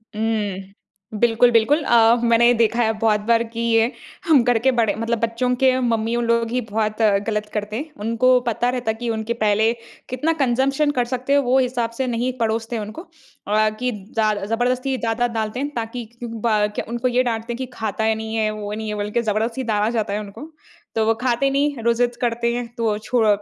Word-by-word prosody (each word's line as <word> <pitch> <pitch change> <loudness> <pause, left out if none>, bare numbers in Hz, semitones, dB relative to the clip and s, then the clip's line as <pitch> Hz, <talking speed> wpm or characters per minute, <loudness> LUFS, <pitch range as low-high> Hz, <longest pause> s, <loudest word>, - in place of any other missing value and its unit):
हुँ। 205 -3 -2 0.5
बिल्कुल-बिल्कुल 240 +5 +4
अ, 230 -2 +5
मैंने 235 0 +4
ये 245 - +5
देखा 235 0 +2
है 220 0 +1
बहुत 215 -2 +2
बार 235 0 +4
की 230 0 -6
ये 225 +2 +3 0.4
हम 290 -7 +5
घर 245 -1 +3
के 265 +3 +3
बड़े 220 -3 +2
मतलब 230 +1 -2
बच्चों 230 +2 0
के 260 0 +3
मम्मीयों 235 -1 0
लोग 235 -1 +1
ही 250 +1 0
बहुत 215 0 -1 0.3
गलत 210 -1 -1
करते 210 0 -3
हैं। 300 +6 -5
उनको 250 +3 +3
पता 240 +2 +1
रहता 250 -3 -1
है 220 - -6
कि 240 -1 -3
उनके 220 +1 -2
पहले 215 +2 +3 0.4
कितना 300 +6 0
कंज़म्पशन 270 +3 +2
कर 245 - +2
सकते 255 +2 -2
हैं 285 - +5
वो 260 +2 +4
हिसाब 245 -2 0
से 260 -1 -1
नहीं 245 +2 -1
परोसते 225 +1 -1
उनको 215 +8 -7
अ, 215 - -2
कि 250 0 0
ज़्या 215 +1 -1
ज़बरदस्ती 250 +4 0
ज़्यादा 230 +1 0
डालते 225 +1 -3
हैं 285 +1 -2
ताकि 230 0 -4 0.2
ब 220 -2 0
क - - -3
उनको 240 +2 -1
ये 250 +1 +2
डांटते 230 0 -3
हैं 235 - -6
कि 260 - -3
खाता 220 0 -2
ही 220 0 +2
नहीं 220 0 -5
है 215 -1 +1
वो 210 -1 -5
नहीं 220 0 -4
है 210 - -3
बल्कि 210 +3 -1
ज़बरदस्ती 225 +3 -1
डाला 215 -2 0
जाता 220 -4 -1
है 210 - -1
उनको। 210 +10 -9 0.5
तो 220 -1 +2
वो 225 - +3
खाते 255 +2 +1
नहीं 285 +1 +1
रो 235 0 +3
ज़िद 240 0 0
करते 235 0 0
हैं 245 -1 -3
तो 230 -1 0
अ, - - -3
छोड़ 230 -1 +1
230 Hz, 210 wpm, -21 LUFS, 220-245 Hz, 0.5 s, अ